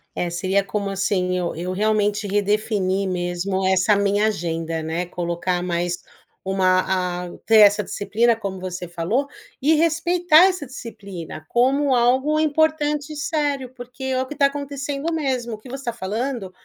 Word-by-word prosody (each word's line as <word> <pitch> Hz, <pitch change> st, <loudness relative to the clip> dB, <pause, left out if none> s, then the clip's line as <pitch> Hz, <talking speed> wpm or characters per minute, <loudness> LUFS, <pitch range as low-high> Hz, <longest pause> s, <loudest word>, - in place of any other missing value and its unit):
É, 175 Hz, -, -1 dB
seria, 190 Hz, +3 st, 0 dB
como 200 Hz, 0 st, -3 dB
assim 190 Hz, -2 st, 0 dB
eu 175 Hz, -1 st, -2 dB
eu 175 Hz, +3 st, -4 dB
realmente 210 Hz, +1 st, +1 dB
redefinir 200 Hz, -1 st, 0 dB
mesmo 180 Hz, +1 st, -2 dB
essa 190 Hz, +2 st, +4 dB
minha 200 Hz, +1 st, +2 dB
agenda, 165 Hz, -5 st, -2 dB
né, 165 Hz, +3 st, -2 dB
colocar 175 Hz, +1 st, -2 dB
mais 175 Hz, 0 st, -1 dB, 0.5 s
uma, 185 Hz, -1 st, +1 dB
ah -, -, -11 dB
ter 225 Hz, -1 st, +5 dB
essa 205 Hz, 0 st, +6 dB
disciplina, 230 Hz, +3 st, +1 dB
como 195 Hz, -4 st, -5 dB
você 180 Hz, -1 st, -5 dB
falou, 180 Hz, +11 st, -1 dB, 0.3 s
e 305 Hz, +4 st, +4 dB
respeitar 335 Hz, +1 st, +4 dB
essa 365 Hz, -5 st, -1 dB
disciplina 200 Hz, -, -8 dB
como 265 Hz, +3 st, +3 dB
algo 260 Hz, +5 st, +3 dB
importante 305 Hz, -1 st, +1 dB
e -, -, -7 dB
sério. 285 Hz, -3 st, -1 dB
Porque 245 Hz, +1 st, -11 dB
é 260 Hz, -1 st, 0 dB
o -, -, -5 dB
que 295 Hz, -, -7 dB
tá 280 Hz, -, +4 dB
acontecendo 280 Hz, +2 st, -3 dB
mesmo. 260 Hz, -7 st, -1 dB
O -, -, -8 dB
que 215 Hz, -, -14 dB
você 270 Hz, +2 st, -7 dB
tá 235 Hz, -, -1 dB
falando, 225 Hz, 0 st, -3 dB
210 Hz, 160 wpm, -22 LUFS, 185-275 Hz, 0.5 s, essa